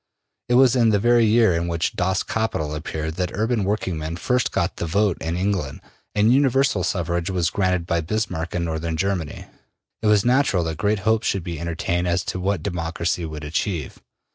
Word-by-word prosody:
It 120 - +3
was 130 -1 +6
in 115 -3 +4
the 105 - +3
very 120 +2 +4
year 110 -3 +4
in 85 +1 -1
which 85 0 -1
``Das 95 +1 0
Kapital'' 95 -9 -2
appeared 80 +1 -4
that 90 -1 -1
urban 110 +1 0
working 95 -4 -1
men 80 +2 -4
first 125 +8 0
got - - -1
the 85 - -3
vote 100 +2 +2
in 80 +2 -2
England 95 -7 -1 0.4
and 105 +3 +4
universal 135 -7 +3
suffrage 85 -1 -1
was 90 -2 0
granted 90 -3 0
by 85 -1 0
Bismarck 85 -2 -3
in 85 -1 0
Northern 80 0 -3
Germany. 90 -3 -2 0.6
It 110 - 0
was 105 0 +4
natural 125 -8 +3
that 80 -2 -3
great 105 -1 +1
hopes 110 0 +2
should 95 - 0
be 85 -3 -5
entertained 85 +1 -1
as 85 +1 +1
to 95 - -3
what 95 -3 -1
democracy 85 -1 -2
would 75 -1 -7
achieve. 80 +1 -3
90 Hz, 190 wpm, -22 LUFS, 85-105 Hz, 0.6 s, was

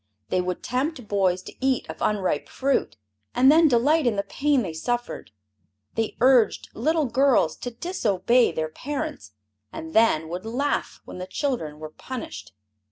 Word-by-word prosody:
They 185 - +1
would 180 0 -4
tempt 255 0 -2
boys 185 -3 +1
to - - -10
eat 265 -2 +1
of - - -9
unripe 190 -8 0
fruit, 275 +1 -1 0.4
and 260 +3 +6
then 325 +1 +6
delight 285 +3 +3
in 230 - +2
the 200 - 0
pain 275 +5 +1
they 170 -5 -5
suffered; 240 +9 -3 0.6
they 225 -1 -2
urged 250 -2 +4
little 310 +5 +1
girls 260 - +3
to 245 - -5
disobey 240 - +1
their 155 0 -2
parents, 285 - -5 0.4
and 160 0 -8
then 220 -9 +3
would 180 +2 -5
laugh 260 +6 -2
when - - -9
the 185 - -5
children 185 - -2
were 155 0 -8
punished. 155 - -8
235 Hz, 160 wpm, -25 LUFS, 185-275 Hz, 0.6 s, and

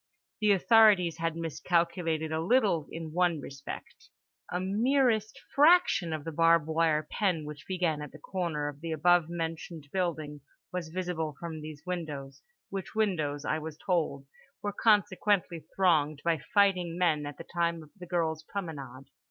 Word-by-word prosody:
The 210 -1 +4
authorities 195 -5 +5
had 165 -1 -1
miscalculated 165 -1 -1
a 160 0 -1
little 195 - +2
in 165 -1 -6
one 175 -1 +2
respect: 135 -1 -9 0.4
a 180 - -1
merest 220 +2 +1
fraction 295 - +5
of 155 -2 -3
the 165 - -5
barb 165 0 +4
wire 160 -1 +1
pen 180 -7 0
which 150 -1 -9
began 175 -5 0
at 150 - -7
the - - -12
corner 160 -3 -3
of 145 0 -7
the 165 -1 -4
above 170 +1 +3
mentioned 165 -2 -5
building 155 -6 -2 0.3
was 180 -3 -3
visible 165 -3 -3
from 165 -2 -6
these 150 -1 -9
windows, 155 -7 -5 0.3
which 195 +2 -5
windows 155 -10 0
(I 155 - 0
was 155 -1 -7
told) 160 -7 -1 0.4
were 205 -1 -2
consequently 195 -5 +2
thronged 155 -6 +2
by 165 -2 +2
fighting 185 -5 +3
men 155 -5 +1
at 145 - -8
the - - -8
time 170 -1 0
of 150 - -17
the 180 -3 -11
girl's 165 -3 -1
promenade. 150 -8 -7
165 Hz, 155 wpm, -29 LUFS, 155-185 Hz, 0.4 s, authorities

